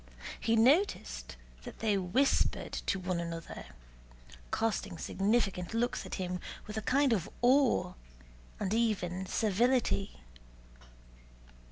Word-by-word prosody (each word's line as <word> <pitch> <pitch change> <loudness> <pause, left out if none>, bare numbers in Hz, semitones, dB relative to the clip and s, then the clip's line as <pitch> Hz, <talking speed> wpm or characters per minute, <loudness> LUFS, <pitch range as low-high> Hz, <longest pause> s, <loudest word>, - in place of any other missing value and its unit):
He 225 - +1
noticed 280 - +2 0.3
that - - -10
they 215 -2 +1
whispered 200 +9 +1
to - - -1
one 180 -1 -2
another, 170 -1 -6 0.9
casting 205 -5 -1
significant 195 0 0
looks 240 +2 -1
at - - -4
him 180 -1 -3 0.3
with 210 - -7
a 220 - -1
kind 270 +2 +3
of 195 -2 -1
awe 245 -8 +4 0.7
and 200 -1 -1
even 190 -5 0
servility. 220 0 +1
210 Hz, 110 wpm, -32 LUFS, 180-240 Hz, 0.9 s, awe